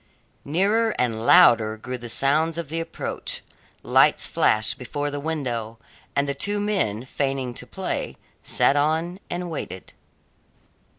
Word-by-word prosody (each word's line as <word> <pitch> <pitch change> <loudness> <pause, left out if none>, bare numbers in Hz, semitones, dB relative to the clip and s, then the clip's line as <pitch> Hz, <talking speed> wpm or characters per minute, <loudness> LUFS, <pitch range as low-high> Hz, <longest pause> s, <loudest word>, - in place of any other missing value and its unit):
Nearer 205 +9 +2
and 115 -2 -1
louder 115 -11 +6
grew 125 +3 -6
the 120 0 -8
sounds 155 +7 +1
of 170 -4 -4
the 165 +1 -1
approach, 165 - -5 0.4
lights - - +4
flashed 110 +5 +1
before 145 +3 -3
the 145 - -4
window, 125 -8 -3 0.4
and 140 0 +2
the 140 - -1
two 205 +9 -1
men, 185 - 0
feigning 135 -2 -2
to - - -8
play, - - -4 0.3
sat 140 - +2
on 160 +5 0
and 175 0 -4
waited. 95 - -6
145 Hz, 135 wpm, -24 LUFS, 120-165 Hz, 0.4 s, louder